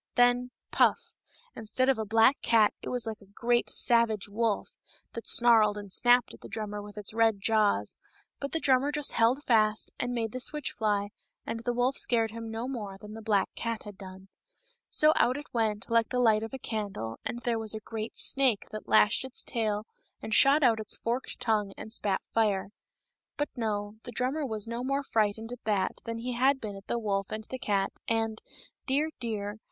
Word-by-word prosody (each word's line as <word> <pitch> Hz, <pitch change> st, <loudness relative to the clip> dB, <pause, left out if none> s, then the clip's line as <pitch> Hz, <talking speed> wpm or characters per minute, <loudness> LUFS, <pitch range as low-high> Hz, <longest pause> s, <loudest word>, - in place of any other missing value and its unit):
Then 245 Hz, 0 st, +3 dB
— -, -, -58 dB
puff! -, -, +2 dB, 0.2 s
— 485 Hz, 0 st, -32 dB
instead 230 Hz, +4 st, -1 dB
of 265 Hz, -4 st, +2 dB
a 220 Hz, -, -2 dB
black 225 Hz, +6 st, +4 dB
cat 220 Hz, -3 st, +4 dB
it -, -, -6 dB
was 245 Hz, -2 st, -1 dB
like 220 Hz, -1 st, -6 dB
a 200 Hz, -, -17 dB
great, 240 Hz, 0 st, +1 dB
savage 230 Hz, -4 st, +3 dB
wolf, 220 Hz, -, -1 dB, 0.4 s
that 230 Hz, -, -7 dB
snarled 225 Hz, -3 st, +5 dB
and 205 Hz, -2 st, -8 dB
snapped 245 Hz, +4 st, +3 dB
at -, -, -14 dB
the -, -, -9 dB
drummer 210 Hz, -2 st, -5 dB
with 205 Hz, 0 st, -11 dB
its 210 Hz, 0 st, -2 dB
red 225 Hz, -2 st, +2 dB
jaws; 215 Hz, 0 st, +1 dB, 0.4 s
but 280 Hz, -, -4 dB
the 325 Hz, -, -1 dB
drummer 275 Hz, 0 st, +3 dB
just 295 Hz, -1 st, +1 dB
held 240 Hz, +5 st, +2 dB
fast 215 Hz, -2 st, +2 dB
and 245 Hz, -, -1 dB
made 225 Hz, -2 st, -2 dB
the 255 Hz, -, -5 dB
switch 300 Hz, +3 st, -1 dB
fly, 205 Hz, -2 st, -1 dB, 0.4 s
and 230 Hz, -, -4 dB
the 245 Hz, +1 st, -2 dB
wolf 245 Hz, +2 st, 0 dB
scared 225 Hz, -2 st, +2 dB
him 230 Hz, 0 st, -7 dB
no 225 Hz, +2 st, -4 dB
more 210 Hz, -7 st, -5 dB
than 210 Hz, +2 st, -11 dB
the 225 Hz, -, -8 dB
black 210 Hz, -3 st, +1 dB
cat 230 Hz, -1 st, -4 dB
had 205 Hz, -2 st, -10 dB
done. 190 Hz, 0 st, -11 dB, 0.6 s
So 305 Hz, 0 st, +4 dB
out 250 Hz, +3 st, +3 dB
it 290 Hz, -, -10 dB
went, 215 Hz, -3 st, -1 dB
like 230 Hz, -1 st, +2 dB
a -, -, +1 dB
light 220 Hz, -3 st, +4 dB
of 225 Hz, -, -5 dB
a 265 Hz, -, -5 dB
candle, 200 Hz, -, -5 dB
and -, -, -3 dB
there 235 Hz, -2 st, -1 dB
was 220 Hz, -1 st, -1 dB
a -, -, -4 dB
great 220 Hz, +1 st, -6 dB
snake 260 Hz, -6 st, +3 dB
that 215 Hz, 0 st, -7 dB
lashed 215 Hz, +5 st, +4 dB
its 265 Hz, 0 st, -1 dB
tail 215 Hz, -3 st, -2 dB, 0.3 s
and 220 Hz, -, -5 dB
shot 280 Hz, +6 st, +6 dB
out 230 Hz, -3 st, +4 dB
its 215 Hz, -, -3 dB
forked 240 Hz, +3 st, -3 dB
tongue 215 Hz, -5 st, 0 dB
and 220 Hz, -, -7 dB
spat 200 Hz, -4 st, 0 dB
fire. 205 Hz, -4 st, +1 dB, 0.7 s
But 290 Hz, -, -1 dB
no; 210 Hz, -3 st, -3 dB
the 245 Hz, -, -9 dB
drummer 265 Hz, +5 st, -1 dB
was 220 Hz, -2 st, -3 dB
no 235 Hz, +1 st, -4 dB
more 275 Hz, +2 st, -1 dB
frightened 220 Hz, -1 st, -1 dB
at 245 Hz, -, -7 dB
that 205 Hz, -3 st, 0 dB
than 230 Hz, 0 st, -4 dB
he 245 Hz, +2 st, -4 dB
had 265 Hz, +3 st, +2 dB
been 210 Hz, -4 st, -6 dB
at 195 Hz, 0 st, -12 dB
the 235 Hz, -, -1 dB
wolf 200 Hz, -3 st, -1 dB
and 215 Hz, 0 st, -5 dB
the 260 Hz, +4 st, -7 dB
cat, 200 Hz, -4 st, 0 dB, 0.2 s
and, 225 Hz, -1 st, -1 dB, 0.5 s
dear, 295 Hz, +4 st, +1 dB
dear! 215 Hz, -3 st, -4 dB
225 Hz, 210 wpm, -29 LUFS, 210-245 Hz, 0.7 s, shot